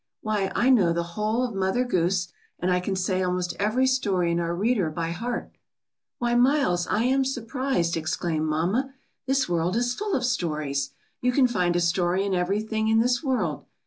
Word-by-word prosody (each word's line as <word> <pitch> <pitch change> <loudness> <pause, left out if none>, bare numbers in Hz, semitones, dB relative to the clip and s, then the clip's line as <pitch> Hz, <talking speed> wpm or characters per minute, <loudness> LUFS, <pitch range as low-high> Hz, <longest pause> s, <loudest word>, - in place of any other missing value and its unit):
Why, 210 -3 -1
I 260 - +3
know 190 -10 +4
the 170 0 -1
whole 215 +4 0
of 245 -3 -2
Mother 195 +6 0
Goose, 180 -3 0 0.3
and 180 +1 -1
I 180 - +3
can 190 +2 -2
say 185 0 0
almost 180 -1 -1
every 215 +6 +2
story 200 -10 +1
in 170 - 0
our 170 0 -1
reader 205 -3 +1
by 165 +1 -3
heart." 235 +7 -4 0.7
"Why, 240 0 0
Miles, 245 -8 +3
I 215 - +1
am 265 +2 +2
surprised," 255 -7 -1
exclaimed 155 0 -1
mamma. 195 - 0 0.3
"This 270 0 +2
world 175 +2 0
is 245 +1 +1
full 415 +6 -2
of - - 0
stories. 150 - -1 0.3
You 250 - +2
can 260 +1 +4
find 180 -7 0
a - - +3
story 175 +2 +1
in 200 - -1
everything 215 +4 0
in 220 0 +4
this 245 +1 +2
world. 265 -3 -1
195 Hz, 185 wpm, -25 LUFS, 175-245 Hz, 0.7 s, know